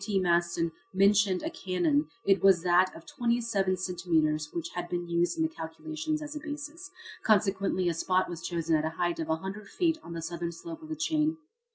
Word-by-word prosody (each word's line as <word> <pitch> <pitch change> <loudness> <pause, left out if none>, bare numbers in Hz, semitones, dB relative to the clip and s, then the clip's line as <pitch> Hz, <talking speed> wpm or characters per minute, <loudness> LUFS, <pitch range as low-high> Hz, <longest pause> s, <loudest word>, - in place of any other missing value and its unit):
T. 200 -1 0
Maston 170 -2 +2 0.2
mentioned 200 -1 +4
a 320 - -2
cannon 175 - +1 0.2
it 195 0 +4
was 190 -4 +5
that 180 +1 +4
of - - -11
27 235 -8 0
centimetres 160 -5 0
which 170 -1 -4
had 175 -1 -4
been 175 -1 -2
used 170 - +1
in 320 - +2
the - - +3
calculations 305 - -4
as 300 +1 -7
a - - -3
basis. 300 +4 -7 0.3
Consequently 195 -3 +2
a 170 - +2
spot 185 +3 +1
was 170 -2 -6
chosen 165 -2 0
at 155 - +1
a 160 +1 -3
height 175 -1 0
of 160 -1 -3
a 160 - +3
hundred 195 +5 -7
feet 330 -3 +1
on 170 - -8
the 165 - -4
southern 170 0 -3
slope 325 - -8
of 315 - -11
the 315 - -2
chain. 310 +1 +1
185 Hz, 205 wpm, -29 LUFS, -, 0.3 s, was